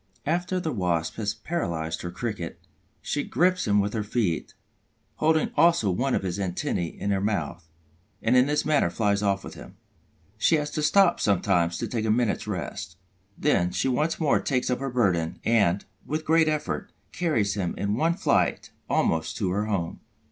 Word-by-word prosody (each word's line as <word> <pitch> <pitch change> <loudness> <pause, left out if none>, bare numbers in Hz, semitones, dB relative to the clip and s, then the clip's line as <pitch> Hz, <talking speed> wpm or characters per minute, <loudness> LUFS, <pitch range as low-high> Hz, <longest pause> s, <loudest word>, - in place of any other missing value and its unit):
After 175 +4 0
the 160 -3 -2
Wasp 90 - -1
has 105 -1 -2
paralyzed 85 - -3
her 90 - -4
Cricket, 95 -2 -5 0.4
she 145 - -1
grips 180 -3 +1
him 105 0 +4
with 100 +1 0
her 110 - -1
feet, 105 -5 -1 0.6
holding 160 0 +2
also 165 - +4
one 125 +8 0
of - - -1
his 95 +1 -3
antennæ 90 -2 -2
in 100 - -2
her 95 -1 +1
mouth, 100 -5 -2 0.5
and 115 +3 +2
in 125 +1 +5
this 150 +1 0
manner 150 - +3
flies 100 +1 +1
off 100 -1 0
with - - -8
him. - - -12 0.6
She 160 - +4
has 150 -1 -1
to 155 - -2
stop 180 +3 +4
sometimes 90 -4 +2
to - - -3
take 110 -2 -2
a - - 0
minute's 110 -1 +1
rest. 85 -4 -5 0.4
Then 90 - +2
she 90 +7 -1
once 150 +6 0
more 155 -4 +3
takes 130 -1 0
up 125 - 0
her 135 0 -3
burden 90 -10 +1
and, 100 -5 +2 0.2
with 155 +1 -2
a - - -24
great 160 0 +4
effort, 155 -1 -2 0.2
carries 115 - 0
him 95 -4 -2
in 100 +1 -1
one 160 +9 +1
flight 190 - +1 0.2
almost 80 -1 +1
to 95 -6 0
her 105 +3 -1
home. 95 -6 -2
110 Hz, 185 wpm, -26 LUFS, 95-150 Hz, 0.6 s, in